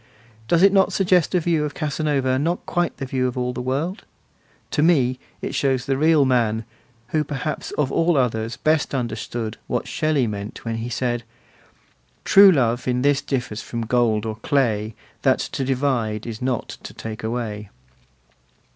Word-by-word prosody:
Does 170 +1 +3
it 195 0 +6
not 195 -1 +4
suggest 180 -2 +2
a - - +4
view 165 -2 +1
of 150 -1 -4
Casanova 145 -3 0
not 170 +5 -1
quite 175 -1 -1
the 135 - -4
view 130 -1 0
of 125 - -4
all 125 0 -1
the 125 - -4
world? 145 - -2 0.7
To 150 - +1
me 130 -6 +3 0.2
it - - -3
shows 130 -2 0
the 135 -1 0
real 155 0 +4
man, 115 -3 +1 0.4
who 155 +2 +1
perhaps 145 +1 -4
of 140 -3 +1
all 165 -1 +2
others 115 -3 0
best 155 -2 +1
understood 115 -2 -3
what 125 - -2
Shelley 155 -5 +1
meant 105 0 -6
when 115 0 -2
he 115 +2 -4
said: 120 0 -1 1.0
True 200 0 +8
love 120 -5 +1
in 125 0 +1
this 145 0 +3
differs 125 -6 -3
from 115 -1 -4
gold 115 -2 +1
or 110 -1 -4
clay 110 -4 0 0.3
That - - +3
to 135 - -3
divide 125 -5 -1
is 115 -2 -6
not 125 -2 -2
to - - -10
take 110 -1 -7
away. 110 -3 -4
130 Hz, 170 wpm, -22 LUFS, 115-150 Hz, 1.0 s, True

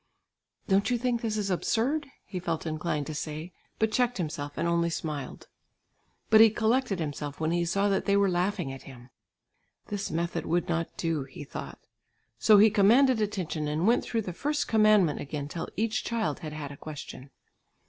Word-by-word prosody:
"Don't 195 +2 +3
you 245 - +2
think 240 -1 -1
this 220 -2 -1
is 200 -2 -1
absurd," 260 - 0 0.2
he 185 - -5
felt 170 -2 -3
inclined 155 -1 -2
to 155 - -5
say, 155 +3 -5 0.2
but 220 0 +1
checked 245 +1 +1
himself 145 -4 -4
and - - 0
only 170 0 +2
smiled. 155 -4 -5 0.8
But 220 0 +8
he 225 - +9
collected 225 0 +1
himself 145 -2 -4
when 160 0 0
he 170 0 +1
saw 195 +4 +1
that 195 - 0
they 200 0 +3
were 200 0 +4
laughing 180 -4 -1
at 135 - -9
him. 125 -1 -13 0.8
"This 205 -1 -3
method 170 +2 -2
would 175 +2 +1
not 170 -1 -2
do," 160 -4 -1
he 135 +2 -10
thought. 140 - -8 0.5
So 210 - +6
he 210 +1 +7
commanded 230 +4 +5
attention 185 -7 -2
and 155 +4 -1
went 235 +3 +3
through 225 -2 -2
the 180 - -5
first 295 - -1
commandment 215 - +4
again 145 0 -5
till 165 +3 -5
each 225 +3 0
child 230 -2 -1
had 155 -3 -7
had 145 -2 -6
a 140 - -10
question. 145 -3 -9
180 Hz, 185 wpm, -28 LUFS, 155-220 Hz, 0.8 s, he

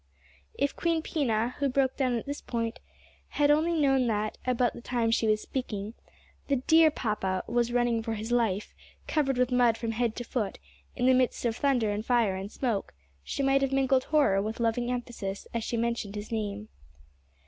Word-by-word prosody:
If 280 0 0
Queen 330 -2 0
Pina, 245 -7 0
who 280 -1 +1
broke 265 0 +1
down 255 -3 +1
at 230 - -5
this 285 +1 -5
point, 230 -1 -3 0.5
had 290 0 +2
only 320 +2 +2
known 270 -3 +3
that, 215 -1 -1
about 250 -1 +2
the - - -10
time 235 -2 0
she 225 0 +2
was 215 0 +2
speaking, 215 -5 -4 0.5
the 280 - +2
dear 320 +5 +5
papa 195 -8 -2
was 240 0 0
running 240 -1 +1
for 225 0 -3
his 220 +2 -5
life, 220 -4 0 0.3
covered 275 -4 0
with 250 0 +2
mud 245 -2 +4
from 230 0 -2
head 230 0 -1
to 240 - -4
foot, 225 -4 -3 0.4
in 245 - 0
the 260 - +6
midst 255 -1 +1
of 230 -2 +1
thunder 245 -6 +1
and 205 +1 -2
fire 230 -5 +2
and 195 +2 -6
smoke, 225 - -2 0.3
she 275 - -3
might 270 0 +3
have 270 -1 +1
mingled 265 -1 +2
horror 280 -11 +3
with 215 +3 -4
loving 235 +1 0
emphasis 235 -5 -4
as 230 -1 -2
she 235 - -2
mentioned 235 -3 -2
his 210 +2 -6
name. 210 -1 -3
240 Hz, 190 wpm, -28 LUFS, 220-265 Hz, 0.5 s, the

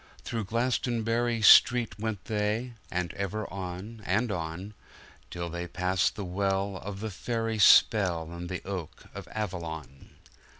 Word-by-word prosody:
Through 115 -3 -3
Glastonbury 115 0 0
street 115 -1 +6
went 110 -3 -3
they; 110 +3 -1 0.2
And 90 -2 -2
ever 100 +2 -3
on, 95 +4 -6
and 105 +5 +1
on, 90 +3 -5 0.6
Till 85 -1 -4
they 85 +1 -5
pass 90 -1 +1
the 100 - -7
well 95 +1 -1
of 100 +1 -7
the 110 -1 -3
fairy 115 +2 -2
spell, 90 -7 +5
And 85 0 -7
the 90 - -5
oak 95 -5 -6
of - - -8
Avalon. 80 -9 -6
100 Hz, 135 wpm, -28 LUFS, 90-110 Hz, 0.6 s, street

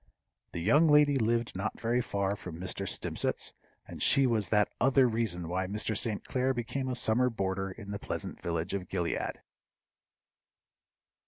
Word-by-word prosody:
The - - -3
young 150 - +5
lady 150 -1 +5
lived 115 -2 0
not 100 +3 -3
very 120 +2 +1
far 100 -3 -1
from 90 -4 -8
Mr. 95 +1 -3
Stimpcett's, - - -3 0.3
and - - -9
she 135 - +5
was 110 -7 +1
that 105 -1 +2
other 135 0 +5
reason 110 -7 -1
why 90 +2 -1
Mr. 105 +2 -1
St. 105 0 -1
Clair 130 0 0
became 130 +3 -3
a 130 - -1
summer 125 +2 +3
boarder 95 -3 -2
in 100 +1 -9
the 100 - -4
pleasant - - -5
village 85 +2 -2
of 95 -3 -4
Gilead. 85 -3 -2
110 Hz, 160 wpm, -30 LUFS, 95-125 Hz, 0.3 s, young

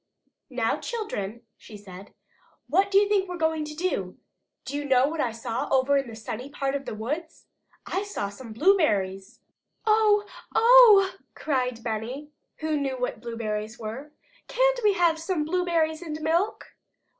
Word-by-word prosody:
"Now, - - 0
children," 235 - -5
she 210 - -12
said, 195 -1 -12 0.6
"what 390 +1 +2
do 395 - +3
you 405 0 +5
think 395 -2 +1
we're 360 - -4
going 320 -1 0
to 300 0 -8
do? 300 - -2 0.5
Do - - -5
you 290 - -2
know 265 -1 +3
what 315 +1 -2
I 240 - 0
saw 230 0 -4
over 270 +1 +3
in 275 -2 +1
the 225 - -9
sunny 225 +4 -6
part 275 -1 -2
of 280 -1 -3
the - - -5
woods? 300 +10 -5 0.4
I 380 - -2
saw 405 - -4
some 225 +3 -11
blueberries!" 215 - +1 0.4
"Oh, 430 -1 +4 0.3
oh!" 455 -5 +7 0.2
cried 250 -5 -2
Benny, 240 +6 -4 0.3
who 310 -1 0
knew 270 -2 -2
what 245 -3 -3
blueberries 220 -2 -4
were. 235 +7 -7 0.4
"Can't - - +2
we 415 -1 +4
have 340 -3 +2
some 330 -2 -1
blueberries 330 -2 0
and 310 -3 -5
milk?" 340 +7 -1
295 Hz, 160 wpm, -26 LUFS, 230-365 Hz, 0.6 s, oh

